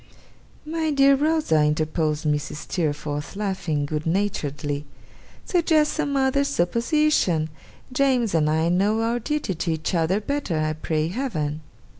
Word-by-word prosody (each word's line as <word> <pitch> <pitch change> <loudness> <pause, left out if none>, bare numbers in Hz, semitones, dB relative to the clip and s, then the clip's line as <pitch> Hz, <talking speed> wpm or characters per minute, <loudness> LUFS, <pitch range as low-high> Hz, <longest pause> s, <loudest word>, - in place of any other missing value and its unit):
'My 320 0 -1
dear 275 -1 +5
Rosa,' 295 - +2
interposed 155 0 0
Mrs. 150 -1 -1
Steerforth, 150 -2 -3
laughing 185 -8 -1
good 150 +2 -3
naturedly, 150 -6 -1 0.6
'suggest 320 -4 +2
some 285 -3 -1
other 270 +1 +2
supposition! 235 - +1 0.4
James 255 -6 +2
and 155 -2 +2
I 160 +2 +2
know 205 +5 +2
our 235 +1 0
duty 295 -5 -2
to 170 0 -2
each 160 +4 -3
other 170 +3 +2
better, 240 - -2
I 155 0 0
pray 155 0 -1
Heaven! 165 - -3
180 Hz, 130 wpm, -24 LUFS, -, 0.6 s, dear